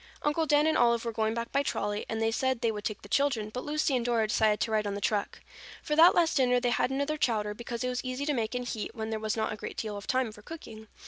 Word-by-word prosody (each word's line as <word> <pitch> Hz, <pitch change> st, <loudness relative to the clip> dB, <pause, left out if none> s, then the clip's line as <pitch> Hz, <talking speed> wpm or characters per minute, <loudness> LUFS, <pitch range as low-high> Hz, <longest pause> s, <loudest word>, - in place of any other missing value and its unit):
Uncle 310 Hz, +2 st, +1 dB
Dan 295 Hz, +1 st, +4 dB
and 315 Hz, -, +2 dB
Olive 235 Hz, -1 st, +3 dB
were 230 Hz, -, -1 dB
going 220 Hz, 0 st, -1 dB
back 235 Hz, 0 st, -4 dB
by 280 Hz, -, +2 dB
trolley 205 Hz, -6 st, -2 dB
and 225 Hz, -, -2 dB
they 225 Hz, 0 st, +1 dB
said 260 Hz, +1 st, 0 dB
they 230 Hz, -, +2 dB
would 210 Hz, -1 st, -6 dB
take 215 Hz, -1 st, -4 dB
the -, -, -10 dB
children, 225 Hz, -3 st, +1 dB
but 250 Hz, -, -4 dB
Lucy 300 Hz, -2 st, 0 dB
and 245 Hz, -, 0 dB
Dora 235 Hz, -2 st, +1 dB
decided 215 Hz, -1 st, +2 dB
to 225 Hz, -, 0 dB
ride 215 Hz, -1 st, +1 dB
on 200 Hz, -, -2 dB
the -, -, -3 dB
truck. 205 Hz, 0 st, -1 dB, 0.4 s
For 300 Hz, -, -1 dB
that 330 Hz, +3 st, +7 dB
last 335 Hz, -2 st, +3 dB
dinner 250 Hz, -2 st, +3 dB
they 245 Hz, 0 st, 0 dB
had 245 Hz, -, +1 dB
another 280 Hz, +3 st, -1 dB
chowder, 215 Hz, -6 st, 0 dB
because 235 Hz, +2 st, -5 dB
it 250 Hz, -, 0 dB
was 250 Hz, -1 st, -3 dB
easy 255 Hz, +2 st, -3 dB
to 300 Hz, -, +1 dB
make 230 Hz, -2 st, -2 dB
and 250 Hz, 0 st, -2 dB
to -, -, -3 dB
heat 215 Hz, -, -5 dB
when 220 Hz, 0 st, -4 dB
there 220 Hz, -, -2 dB
was 215 Hz, 0 st, -2 dB
not 220 Hz, -, -1 dB
a -, -, -7 dB
great -, -, -7 dB
deal 215 Hz, -2 st, -3 dB
of 200 Hz, -, -8 dB
time 255 Hz, -3 st, +1 dB
for 210 Hz, -, -14 dB
cooking. 220 Hz, -5 st, -10 dB
235 Hz, 300 wpm, -29 LUFS, 220-265 Hz, 0.4 s, that